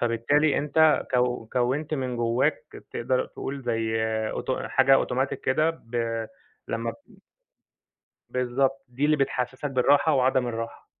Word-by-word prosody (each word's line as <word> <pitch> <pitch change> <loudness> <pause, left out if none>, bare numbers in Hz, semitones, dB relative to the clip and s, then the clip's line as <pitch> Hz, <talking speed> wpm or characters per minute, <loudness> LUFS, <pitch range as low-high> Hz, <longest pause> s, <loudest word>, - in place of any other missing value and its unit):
فبالتالي 130 +6 +2
أنت 155 +1 +3
كو 125 -2 +1
كوِّنت 135 +5 0
من 130 -3 -3
جوّاك 120 +3 -1
تقدر 125 +2 0
تقول 135 0 -6
زي 115 -2 -1 0.3
أوتو 130 - -3
حاجة 135 0 +5
أوتوماتيك 135 +1 0
كده 155 +5 +2
ب 115 -6 -3 0.4
لمّا 115 0 -2
ب 285 - -17 1.1
بالضبط، 135 +2 0
دي 125 +4 -3
اللي 155 +1 +4
بتحسسك 135 0 -2
بالراحة 140 +4 +3
وعدم 130 -1 +2
الراحة. 115 -1 -5
130 Hz, 125 wpm, -26 LUFS, 120-140 Hz, 1.1 s, حاجة